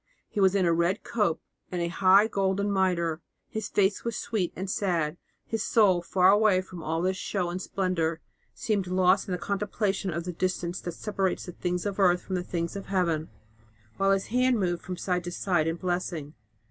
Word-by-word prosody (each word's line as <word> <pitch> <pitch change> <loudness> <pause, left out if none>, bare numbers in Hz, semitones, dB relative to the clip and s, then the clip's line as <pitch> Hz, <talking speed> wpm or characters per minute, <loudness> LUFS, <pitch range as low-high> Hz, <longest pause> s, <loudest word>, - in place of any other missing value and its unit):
He - - -4
was 190 0 +4
in 190 -2 +3
a 170 - +3
red 170 +4 +1
cope 210 -9 0 0.3
and 180 - -2
a 170 - 0
high 190 +3 +5
golden 200 -1 0
mitre. 170 -4 +1 0.3
His 220 -1 -4
face 200 0 +1
was 235 -1 -2
sweet 210 -7 -1
and 190 +2 -4
sad; 175 -6 0 0.3
his 225 -1 -2
soul, 195 -7 +4
far 185 +2 +4
away 205 -2 +4
from 185 -2 -10
all 160 +2 -1
this 185 +1 +1
show 180 -4 -2
and 180 +1 -4
splendour, 170 -4 -1 0.4
seemed 205 -4 -1
lost 185 +1 +3
in - - -4
the 180 - 0
contemplation 200 +1 -1
of 170 +1 -3
the 180 +1 -5
distance 180 0 -2
that 175 - -5
separates 195 0 -2
the 180 - -7
things 180 +1 -3
of 205 -1 -3
earth 180 -2 +4
from 190 - -6
the 180 - 0
things 170 -1 -3
of 200 - -6
Heaven, 170 -5 0 0.7
while 195 - +2
his 195 0 +2
hand 250 -1 +3
moved 175 -3 0
from 180 0 -6
side 180 -1 -1
to 175 - -4
side 175 -3 0
in 165 - 0
blessing. 175 -4 -3
185 Hz, 200 wpm, -27 LUFS, 175-195 Hz, 0.7 s, high